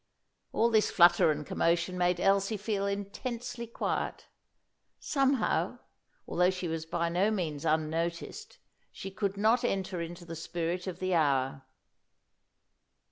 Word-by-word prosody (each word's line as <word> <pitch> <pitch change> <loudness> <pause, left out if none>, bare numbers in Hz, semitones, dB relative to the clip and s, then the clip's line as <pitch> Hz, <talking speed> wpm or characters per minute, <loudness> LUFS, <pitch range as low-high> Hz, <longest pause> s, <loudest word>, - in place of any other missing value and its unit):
All 230 +1 +2
this 220 -1 +4
flutter 175 -2 +6
and 150 -1 -1
commotion 170 +4 +1
made 180 0 +1
Elsie 195 +3 +2
feel 205 -1 -1
intensely 235 +4 -4
quiet. 230 - -3 0.7
Somehow, 270 -4 +1 0.5
although 180 +1 +3
she 185 -1 -3
was 160 0 -3
by 170 0 0
no 180 +5 +2
means 165 -8 -2
unnoticed, 165 - -2 0.3
she 195 - -7
could 200 0 -2
not 225 +4 +3
enter 190 -5 -1
into 170 +1 -7
the 165 -1 -7
spirit 170 +2 -3
of 180 -2 -4
the 185 0 -1
hour. 135 -4 +2
180 Hz, 130 wpm, -30 LUFS, 170-205 Hz, 0.7 s, flutter